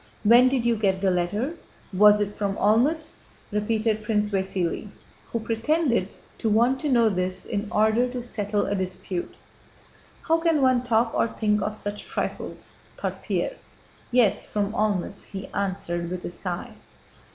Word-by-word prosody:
"When 240 +4 +7
did 255 -3 0
you 235 -1 +2
get 195 -3 +1
the 190 -1 +2
letter? 205 - -1 0.4
Was 210 +2 +6
it 205 0 -2
from 200 -1 -1
Olmütz?" 270 +11 +2 0.3
repeated 215 +1 0
Prince 210 -1 0
Vasíli, 190 -1 -1 0.4
who 230 - -1
pretended 230 - 0 0.2
to 225 - 0
want 240 +5 +3
to 300 - -1
know 235 -3 +4
this 185 -2 -1
in 205 +1 -3
order 220 +4 +3
to 245 -1 -5
settle 210 -3 -1
a - - -1
dispute. 185 -1 -3 0.9
"How 325 0 +2
can 330 -2 +2
one 255 -2 +4
talk 230 -1 +1
or - - +2
think 210 -2 0
of 210 0 -2
such 205 0 -5
trifles?" - - -5 0.2
thought - - -4
Pierre. - - -2 0.5
"Yes, 240 -5 +3
from 205 0 -1
Olmütz," 205 -3 -1
he 195 -1 -7
answered, 175 -3 -2
with 180 0 -5
a - - -4
sigh. 175 -1 -5
210 Hz, 155 wpm, -25 LUFS, 195-235 Hz, 0.9 s, When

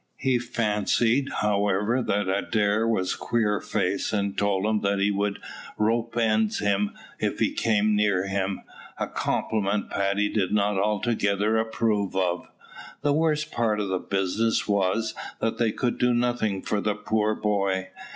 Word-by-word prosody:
He 130 -2 +1
fancied, 115 +2 +1
however, 105 +3 +1
that 105 -4 0
Adair 105 +3 +1
was 95 -5 0
Queerface; 105 -3 -1
and 100 -2 -1
told 100 -1 +1
him 110 -1 +1
that 100 0 +1
he 100 +1 +2
would 100 0 -1 0.4
rope's 115 +2 0
end 110 -1 +2
him 100 0 0 0.2
if - - -1
he - - +1
came 105 -1 +2
near 100 -3 +2
him, 95 0 -2 0.4
a - - -1
compliment 105 -1 -1
Paddy 100 +1 +1
did 100 -3 -1
not 105 -1 +2
altogether 105 0 +1
approve 110 -3 0
of. 90 -2 0 0.6
The 145 - +3
worst 155 -1 +1
part 110 -3 0
of 100 -2 -2
the 95 -1 0
business 100 +5 0
was, 100 +2 +1 0.3
that 115 - -1
they 115 -2 +2
could 120 +2 -2
do 125 -1 +3
nothing 120 -5 0
for 105 - -1
the 105 0 0
poor 110 0 0
boy. 100 -3 0
105 Hz, 150 wpm, -25 LUFS, 100-115 Hz, 0.6 s, The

